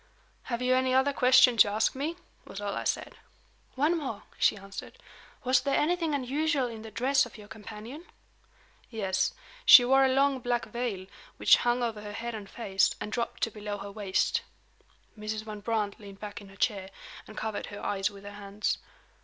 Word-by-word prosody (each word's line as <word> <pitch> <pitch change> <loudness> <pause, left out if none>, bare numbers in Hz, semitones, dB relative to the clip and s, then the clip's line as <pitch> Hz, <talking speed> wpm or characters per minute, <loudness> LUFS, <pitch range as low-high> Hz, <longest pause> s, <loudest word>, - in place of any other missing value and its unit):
"Have 240 0 -2
you 255 0 +3
any 255 0 +2
other 270 +2 +3
question 255 -2 +6
to 205 -1 +7
ask 215 +2 +1
me?" 295 +5 -3 0.3
was 195 - -9
all 205 -1 -3
I - - -4
said. - - -2 0.6
"One 300 +6 +2
more," 265 -10 -4 0.2
she - - +3
answered. 195 0 -9 0.5
"Was 255 -1 +3
there 275 +1 +1
anything 325 -1 +1
unusual 285 +1 0
in 225 -2 -8
the 220 - -8
dress 265 +6 +2
of - - -14
your 210 -1 -12
companion?" 220 - -9 0.8
"Yes. 195 -5 -1 0.3
She 250 - +10
wore 270 +2 +5
a 265 - +4
long 270 0 +3
black 245 -1 -1
veil, 235 -6 -4 0.3
which - - +6
hung 240 0 +1
over 225 -3 -2
her 210 0 -7
head 235 +2 -4
and 205 -3 -7
face, 195 -5 +1
and 210 - -5
dropped 235 +1 -3
to 225 - +1
below 210 -1 -5
her 200 0 -8
waist." 200 -2 0 0.7
Mrs. 215 0 -4
Van 215 -1 -7
Brandt 210 -2 -2
leaned 200 -2 -12
back 205 -1 -7
in 200 - -13
her 195 - -15
chair, 195 -2 -1 0.4
and 215 - -12
covered 220 -2 -3
her 205 - -8
eyes 195 -1 0
with 200 -1 -13
her 205 - -8
hands. 205 0 -3
225 Hz, 190 wpm, -29 LUFS, 205-260 Hz, 0.8 s, She